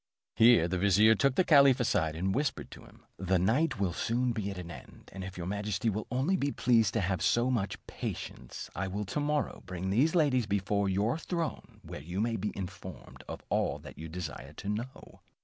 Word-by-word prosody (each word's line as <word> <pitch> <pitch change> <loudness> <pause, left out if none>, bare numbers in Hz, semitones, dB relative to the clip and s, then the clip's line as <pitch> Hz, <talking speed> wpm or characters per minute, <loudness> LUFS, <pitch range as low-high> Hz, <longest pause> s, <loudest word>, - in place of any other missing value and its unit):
Here 115 -7 +6
the 90 +1 -2
vizier 100 +3 +5
took 135 +4 +2
the 185 - +4
caliph 140 -6 +6
aside, 85 -10 +1
and 95 +4 -1
whispered 140 +5 -2
to - - -12
him, - - -19
"The 95 +1 +1
night 115 - +1
will 95 -4 0
soon 120 +7 0
be 110 -4 -3
at 95 - -6
an 85 -1 -7
end, - - -13
and 95 0 -6
if 95 -1 -8
your 85 - -4
majesty 105 +3 -1
will 105 +2 -4
only 135 +10 +1
be 140 -5 0
pleased 115 -7 +2
to - - +2
have 95 -2 -1
so 120 +2 +2
much 110 -6 -1
patience, - - -6
I 95 +3 -2
will 100 +2 -3
to 100 - -3
morrow 150 0 0
morning - - -24
bring 90 +1 -4
these 145 - +3
ladies 135 -8 +3
before 100 0 0
your 105 +10 0
throne, 170 -2 -4
where - - -8
you 90 +6 -5
may 115 +1 0
be 105 0 -2
informed 95 -1 -8
of - - -7
all - - 0
that - - -12
you 80 +1 -7
desire 85 -2 -7
to 100 - -6
know." 115 +5 -6
105 Hz, 215 wpm, -30 LUFS, 95-125 Hz, -, Here